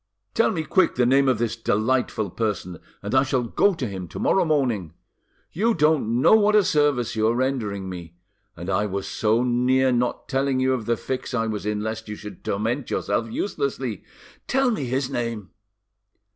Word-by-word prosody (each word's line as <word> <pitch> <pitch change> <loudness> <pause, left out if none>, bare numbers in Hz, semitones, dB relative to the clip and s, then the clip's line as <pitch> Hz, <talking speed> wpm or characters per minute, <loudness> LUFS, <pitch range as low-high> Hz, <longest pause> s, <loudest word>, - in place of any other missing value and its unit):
"Tell - - +3
me 160 -3 -2
quick 190 +4 +2
the 125 - +3
name 135 +2 +4
of 125 - +2
this 115 0 -1
delightful 115 -2 0
person, 95 -6 -3 0.2
and 100 - -4
I 130 - +6
shall 130 -2 0
go 190 - +2
to 135 - -3
him 95 -3 -6
to - - -9
morrow 195 - +2
morning. 125 - 0 0.6
You 220 +5 +1
don't 135 -6 +2
know - - +6
what 210 -1 +5
a 210 - +6
service 145 -9 +1
you 110 0 +2
are 115 - +2
rendering 115 -7 -1
me. 85 -2 -8 0.4
And 85 +1 -7
I 100 +2 +1
was 100 0 -4
so 110 +2 +1
near 125 +2 +2
not 125 0 -1
telling 135 0 0
you 130 0 +2
of 120 -4 -3
the 120 -1 +1
fix 130 +1 -4
I 115 -2 +1
was 105 -2 -3
in, 105 0 -1
lest 110 0 -4
you 105 - -4
should 105 -3 -10
torment 115 +6 -2
yourself 100 - -1
uselessly. 395 - -3 0.4
Tell 265 -1 +2
me 150 - -2
his 130 +2 -1
name." 115 -6 -4
120 Hz, 190 wpm, -24 LUFS, 105-135 Hz, 0.6 s, I